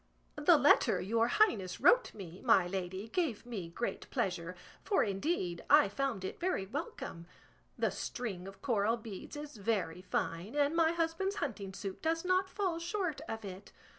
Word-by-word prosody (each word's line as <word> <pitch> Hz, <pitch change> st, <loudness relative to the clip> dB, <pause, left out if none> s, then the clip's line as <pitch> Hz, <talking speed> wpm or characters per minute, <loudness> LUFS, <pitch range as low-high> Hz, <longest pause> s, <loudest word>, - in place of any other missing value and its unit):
The -, -, +7 dB
letter -, -, +5 dB
your 225 Hz, +4 st, +1 dB
highness 225 Hz, -, +2 dB
wrote -, -, +5 dB
me, 185 Hz, -3 st, -9 dB
my 225 Hz, -7 st, +5 dB
lady, 190 Hz, +2 st, -4 dB
gave 300 Hz, -, -1 dB
me 205 Hz, -9 st, -5 dB
great 235 Hz, +8 st, -4 dB
pleasure, 180 Hz, -8 st, -2 dB, 0.3 s
for 405 Hz, -, +3 dB
indeed 195 Hz, -, -1 dB
I -, -, +7 dB
found 235 Hz, -4 st, -2 dB
it -, -, -5 dB
very 345 Hz, -, 0 dB
welcome. 270 Hz, -, -6 dB, 0.5 s
The -, -, +1 dB
string 195 Hz, -8 st, -4 dB
of 195 Hz, -, -12 dB
coral 225 Hz, -2 st, +2 dB
beads 215 Hz, -1 st, -8 dB
is 295 Hz, -3 st, -7 dB
very 195 Hz, -5 st, -1 dB
fine, 175 Hz, -, -2 dB
and 290 Hz, +2 st, +2 dB
my 330 Hz, 0 st, +4 dB
husband's 340 Hz, +4 st, 0 dB
hunting 210 Hz, -, -3 dB
suit 190 Hz, 0 st, -6 dB
does 330 Hz, +2 st, 0 dB
not 370 Hz, +1 st, +2 dB
fall 370 Hz, -4 st, -1 dB
short 340 Hz, -4 st, -2 dB
of 225 Hz, -1 st, -4 dB
it. 190 Hz, +1 st, -9 dB
225 Hz, 165 wpm, -33 LUFS, -, 0.5 s, The